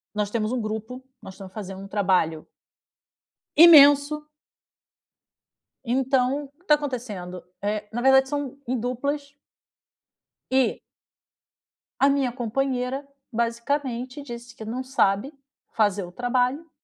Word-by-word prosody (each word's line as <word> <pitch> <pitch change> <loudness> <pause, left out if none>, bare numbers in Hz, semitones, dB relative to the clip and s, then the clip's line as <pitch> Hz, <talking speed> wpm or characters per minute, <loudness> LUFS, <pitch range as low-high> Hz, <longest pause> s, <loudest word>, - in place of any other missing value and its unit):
Nós 210 -1 -1
temos 215 -1 -1
um 255 - -1
grupo, 220 +4 -5 0.2
nós 190 - -10
estamos 190 -1 -11
fazendo 195 -2 -7
um 195 - -9
trabalho 185 -6 +1 1.1
imenso. 300 -2 +7 1.6
Então, 265 +2 +1
que 360 - -30
tá 300 - +6
acontecendo, 225 -11 -5 0.2
eh, 210 0 -2
na 240 +2 -3
verdade 265 0 +5
são 285 -2 -3
em 255 0 0
duplas. 280 +4 -3 1.2
E 260 -1 +2 1.2
A 275 - +7
minha 275 -3 +1
companheira 255 +2 -2 0.2
basicamente 245 +3 -2
disse 240 -2 -9
que 220 - -8
não 235 +4 -4
sabe 255 0 0 0.4
fazer 205 -2 +2
o 175 - -8
trabalho. 250 - -1
250 Hz, 115 wpm, -24 LUFS, 215-275 Hz, 1.6 s, imenso